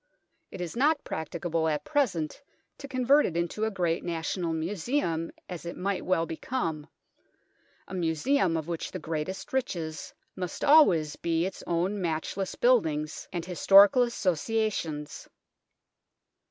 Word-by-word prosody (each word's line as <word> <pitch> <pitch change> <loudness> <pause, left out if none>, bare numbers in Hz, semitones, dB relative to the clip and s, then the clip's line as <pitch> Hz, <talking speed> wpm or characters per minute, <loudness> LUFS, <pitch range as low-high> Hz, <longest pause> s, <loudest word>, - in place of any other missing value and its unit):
It 185 - -8
is 175 +2 -5
not 290 +4 +2
practicable 160 +1 -2
at 150 -2 -1
present 240 - 0 0.4
to 280 - -7
convert 265 +2 +4
it 170 - -4
into 170 +6 -1
a - - +1
great 175 -5 -1
national 170 +1 -2
museum, 165 - -1 0.2
as 180 -3 -7
it 170 0 -6
might 195 +1 -2
well 175 -3 +1
become 160 - -3 1.0
a - - -10
museum 170 - +1
of 160 -1 -4
which 170 -2 -4
the - - -4
greatest 165 +7 -5
riches 170 -12 -3 0.2
must 180 -2 -5
always 180 - +5
be 165 0 0
its 190 - -6
own 180 +4 0
matchless 175 +3 -2
buildings 160 -12 +1
and 175 -2 -4
historical 195 +6 +6
associations. 195 -7 -1
175 Hz, 130 wpm, -28 LUFS, 160-215 Hz, 1.0 s, historical